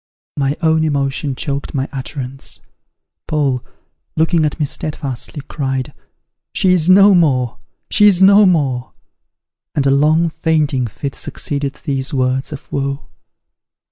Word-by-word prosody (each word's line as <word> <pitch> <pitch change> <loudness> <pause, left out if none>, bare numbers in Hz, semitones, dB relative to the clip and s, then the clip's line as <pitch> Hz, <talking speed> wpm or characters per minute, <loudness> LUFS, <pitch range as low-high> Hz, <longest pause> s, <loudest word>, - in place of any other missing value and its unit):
'" - - -89
My 140 +2 -1
own 160 0 +3
emotion 140 -2 -1
choked 140 +2 -4
my 135 0 -1
utterance. 135 -1 -6 0.7
Paul, 140 -5 0 0.5
looking 160 0 +2
at 150 - -3
me 150 - +1
steadfastly, 140 -1 -4
cried, 135 -3 -3 0.6
"She 185 -1 +3
is 175 -1 +2
no 195 +2 +7
more! 130 -9 +2 0.3
she 210 - +5
is 190 -4 +4
no 200 +1 +7
more!" 135 -8 0 0.8
and 145 - +1
a 135 - +4
long 155 +4 +3
fainting 155 -5 0
fit 135 +5 -5
succeeded 140 -1 -3
these 135 -3 -3
words 130 +1 0
of 145 - -9
woe. 140 0 -3
145 Hz, 135 wpm, -17 LUFS, 135-160 Hz, 0.8 s, no